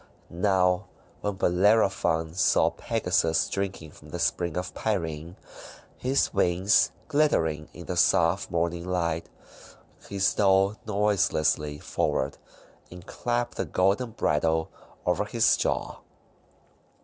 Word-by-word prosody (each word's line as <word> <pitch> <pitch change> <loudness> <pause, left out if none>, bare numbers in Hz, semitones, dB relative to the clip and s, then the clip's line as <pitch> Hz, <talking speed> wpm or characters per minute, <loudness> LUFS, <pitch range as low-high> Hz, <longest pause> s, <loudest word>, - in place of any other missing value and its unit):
Now, 90 +1 +1 0.3
when 105 -1 -3
Bellerophon 95 -4 +2
saw 90 - +3
Pegasus 80 0 0
drinking 95 -5 -4
from - - -16
the - - -5
Spring 85 -1 -1
of 90 0 -4
Pirene, 85 -5 -3 0.6
his 130 +2 0
wings 90 +4 +3 0.2
glittering 85 - +1
in 85 - -11
the 90 - -4
soft 85 +2 +2
morning 85 0 -1
light, 85 -2 -2 0.8
he 100 - -5
stole 95 +1 +3
noiselessly 95 -8 +1
forward 70 -1 -2 0.5
and 90 0 -12
clapped 120 0 -3
the - - -1
golden 100 +7 +1
bridle 80 -6 0 0.3
over - - +1
his - - +3
jaw. - - -2
90 Hz, 110 wpm, -26 LUFS, 85-100 Hz, 0.8 s, saw